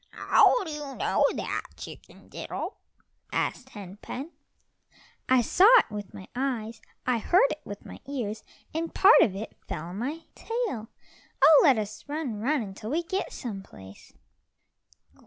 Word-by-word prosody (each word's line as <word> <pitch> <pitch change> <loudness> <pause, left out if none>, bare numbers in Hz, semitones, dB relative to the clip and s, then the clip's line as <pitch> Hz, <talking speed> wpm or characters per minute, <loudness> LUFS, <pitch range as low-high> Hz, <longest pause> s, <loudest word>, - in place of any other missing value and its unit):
"How - - +4
do 325 - -6
you 295 -3 -6
know - - +1
that - - -2 0.2
Chicken - - -11
diddle?" - - -6 0.5
asked 265 - -2
Hen 200 -4 -10
pen. 275 +9 -7 1.0
"I 255 -1 +5
saw 365 - +5
it 415 - +2
with 205 -2 -6
my 190 - -10
eyes, 240 -4 -3 0.2
I 250 -2 +1
heard 345 - +4
it 305 - -5
with 205 0 -8
my - - -10
ears, 225 -6 -4 0.3
and 325 +1 -3
part 395 +4 +7
of 190 - +3
it 215 +3 -7
fell 155 - -4
on 175 +4 -7
my 290 +8 -3
tail. 450 - -3 0.5
Oh, 310 -2 +9
let 270 -6 +5
us 215 +6 -5
run, 285 -8 -3
run, 270 +3 +1
until 205 +1 -8
we 325 +6 0
get 380 +3 -3
some 215 -7 -6
place." 95 - -14
250 Hz, 155 wpm, -27 LUFS, 210-305 Hz, 1.0 s, Oh